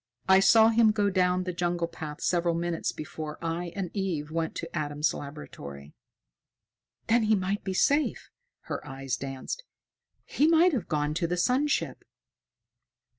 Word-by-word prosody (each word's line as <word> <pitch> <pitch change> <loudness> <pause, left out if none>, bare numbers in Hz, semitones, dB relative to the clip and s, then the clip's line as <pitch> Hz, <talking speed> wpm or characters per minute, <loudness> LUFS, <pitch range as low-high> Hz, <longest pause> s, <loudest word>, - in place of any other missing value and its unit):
I 190 0 +7
saw 220 +3 +6
him 225 -1 +5
go 205 -2 +1
down 180 -1 +2
the 180 0 -3
jungle 175 -1 -1
path 150 -3 -8
several 170 -1 +1
minutes 170 0 -1
before 155 0 -7
I 170 +1 -3
and 190 -4 -3
Eve 170 -7 -2
went 165 0 -2
to 165 0 -6
Adam's 150 -1 0
laboratory." 75 - -9 1.1
"Then 235 +1 +3
he 215 0 +3
might 195 +1 -2
be 190 -1 -3
safe!" 290 +9 +1 0.3
Her - - -5
eyes 135 -2 -4
danced. 135 - -5 0.6
"He 295 - +2
might 335 +2 +5
have 230 -10 -2
gone 150 -2 0
to 170 +2 0
the 180 +1 -1
sun 255 +11 +2
ship." 295 - -1
175 Hz, 155 wpm, -28 LUFS, 155-205 Hz, 1.1 s, I